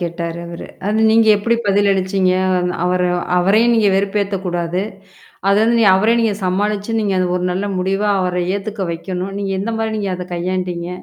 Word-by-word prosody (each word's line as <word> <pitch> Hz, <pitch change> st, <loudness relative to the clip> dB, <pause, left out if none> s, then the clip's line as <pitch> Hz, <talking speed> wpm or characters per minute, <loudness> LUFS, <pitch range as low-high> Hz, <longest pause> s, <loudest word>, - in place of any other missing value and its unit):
கேட்டாரு 170 Hz, -1 st, -4 dB
அவரு. 170 Hz, 0 st, -8 dB, 0.2 s
அது 210 Hz, +1 st, 0 dB
நீங்க 225 Hz, 0 st, +4 dB
எப்படி 230 Hz, +3 st, +1 dB
பதில் 200 Hz, 0 st, +3 dB
அளிச்சீங்க? 190 Hz, -1 st, +1 dB, 0.2 s
அந் 180 Hz, 0 st, 0 dB
அவர 180 Hz, 0 st, +1 dB, 0.3 s
அவரையும் 210 Hz, +7 st, +3 dB
நீங்க 220 Hz, -3 st, +3 dB
வெறுப்பேத்தக்கூடாது. 190 Hz, -3 st, -1 dB, 0.7 s
அது 200 Hz, +1 st, +4 dB
வந்து 235 Hz, +1 st, +3 dB
நீங்க 215 Hz, -4 st, +5 dB
அவரையும் 225 Hz, +5 st, +3 dB
நீங்க 220 Hz, -2 st, +1 dB
சமாளிச்சு, 205 Hz, +3 st, -1 dB
நீங்க 205 Hz, -2 st, 0 dB
அது 185 Hz, -, +1 dB
ஒரு 180 Hz, -, -2 dB
நல்ல 190 Hz, +3 st, -2 dB
முடிவா 195 Hz, +3 st, 0 dB
அவர 180 Hz, -1 st, -1 dB
ஏத்துக்க 200 Hz, 0 st, -4 dB
வைக்கணும். 185 Hz, +3 st, -5 dB
நீங்க 200 Hz, -1 st, -3 dB
எந்த 225 Hz, +4 st, -3 dB
மாரி 220 Hz, 0 st, -2 dB
நீங்க 200 Hz, -2 st, -2 dB
அத 180 Hz, 0 st, -6 dB
கையாண்டீங்க? 180 Hz, -1 st, -3 dB
195 Hz, 175 wpm, -18 LUFS, 180-210 Hz, 0.7 s, நீங்க